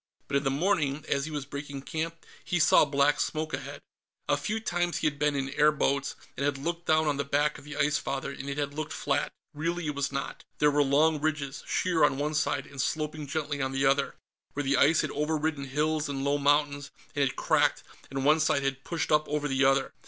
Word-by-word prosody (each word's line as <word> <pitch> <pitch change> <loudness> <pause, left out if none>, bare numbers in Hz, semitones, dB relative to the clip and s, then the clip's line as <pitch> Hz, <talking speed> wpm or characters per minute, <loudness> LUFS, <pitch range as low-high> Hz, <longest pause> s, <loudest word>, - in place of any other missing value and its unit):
But 140 - +1
in 140 - -1
the 135 - +1
morning, 150 -1 0
as 140 0 0
he 155 - -6
was 145 -2 -4
breaking 140 -1 -7
camp, 165 +2 -4 0.2
he 175 - -1
saw 155 - +6
black 140 0 +2
smoke 155 0 -2
ahead. - - -5 0.5
A - - +3
few 215 +1 -2
times, 175 -5 -1
he - - -2
had 145 -2 0
been 150 -1 +2
in 135 -1 -2
air 150 +2 +4
boats, 140 -1 0 0.2
and - - -3
had 140 -1 +1
looked 170 +4 -4
down 155 0 +4
on 145 -2 +1
the 140 - 0
back 145 +1 0
of - - -16
the 150 -1 -7
Ice 150 0 +2
Father, 135 0 -3
and 140 0 -7
it 140 - -4
had 145 -1 -2
looked 155 +1 -4
flat. - - -1 0.2
Really, 170 +3 -2
it 150 - -1
was 140 -1 -2
not. 140 0 -4
There 150 0 +4
were 145 0 +3
long 145 +2 +3
ridges, 150 -3 -2
sheer 175 -4 +1
on 135 -2 +4
one 150 +2 -1
side 150 -1 0
and 140 -1 -5
sloping 155 0 -2
gently 145 0 -2
on 130 0 -1
the 135 +1 +1
other, 135 +1 +2 0.4
where 145 - -2
the 140 0 +2
ice 155 +3 +5
had - - -3
overridden 150 -1 -1
hills 150 +2 0
and 135 -1 -3
low 140 +1 +1
mountains, 145 0 +2 0.3
or - - -2
had 135 -2 +1
cracked - - +2 0.3
and 135 0 -3
one 155 +2 +5
side 150 -2 +2
had 135 0 -2
pushed 165 -3 -3
up 150 -1 +3
over 150 0 -1
the 135 0 +1
other. 135 0 +3
145 Hz, 235 wpm, -28 LUFS, 140-155 Hz, 0.5 s, saw